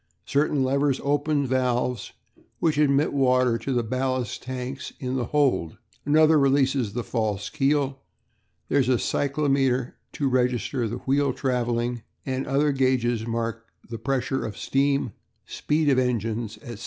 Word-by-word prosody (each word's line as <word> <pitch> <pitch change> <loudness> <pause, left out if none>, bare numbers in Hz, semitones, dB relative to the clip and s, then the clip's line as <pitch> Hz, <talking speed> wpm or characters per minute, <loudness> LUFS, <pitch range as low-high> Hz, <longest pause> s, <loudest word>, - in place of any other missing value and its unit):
Certain 145 -1 +1
levers 140 +1 +1
open 145 +1 +1
the - - -3
valves 125 -3 0 0.4
which 155 -3 +1
admit 145 0 +3
water 125 -3 +3
to 140 - -4
the 120 -2 +1
ballast 130 0 -2
tanks 130 +1 -5
in 130 0 -3
the 125 -2 -1
hold; 140 - +1 0.3
another 155 +1 +5
releases 135 -5 +2
the 120 +1 -2
false 105 -4 -2
keel; 140 -2 0 0.7
there 140 - +2
is 130 - +1
a 125 - +4
cyclometer 135 -2 0 0.2
to 145 -3 -1
register 125 -1 0
the 115 +3 -4
wheel 140 +1 +2
travelling, 120 -2 -1 0.2
and 130 0 -2
other 145 +2 +2
gauges 125 -4 +1
mark 115 0 -3 0.2
the 115 - -5
pressure 135 +2 -1
of 110 -2 -5
steam, 140 -3 0 0.3
speed 150 +1 -1
of 135 -2 +4
engines, 115 -3 -1
&c. 120 -2 -7
130 Hz, 145 wpm, -25 LUFS, 120-140 Hz, 0.7 s, another